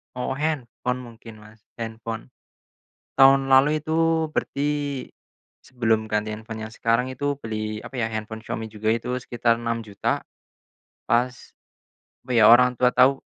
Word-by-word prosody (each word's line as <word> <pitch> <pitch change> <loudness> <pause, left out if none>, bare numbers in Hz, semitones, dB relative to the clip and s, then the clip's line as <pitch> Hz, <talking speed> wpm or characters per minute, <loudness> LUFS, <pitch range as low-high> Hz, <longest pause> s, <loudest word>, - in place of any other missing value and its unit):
Oh, 130 +1 -3
handphone 125 -4 -2
mungkin 115 -2 -12
Mas, 105 0 -18
handphone. 115 0 -6 0.9
Tahun 135 0 +6
lalu 140 +3 +5
itu 160 0 +1
berarti 145 -2 -2 0.6
sebelum 115 -4 0
ganti 105 0 -1
handphone 110 +1 -7
yang 110 - -10
sekarang 115 +3 +1
itu 145 +2 -2
beli 110 -1 -4
apa 135 - -9
ya, 120 - +1
handphone 110 0 -5
Xiaomi 110 0 -4
juga 110 +1 0
itu 125 +2 -2
sekitar 120 -1 0
Rp6.000.000. 115 -3 -2 0.9
Pas, 125 +1 -1 0.7
apa 125 - -7
ya, 115 -3 +6
orang 125 +1 +6
tua 125 0 +4
tahu 135 +2 +5
120 Hz, 135 wpm, -24 LUFS, 110-135 Hz, 0.9 s, Tahun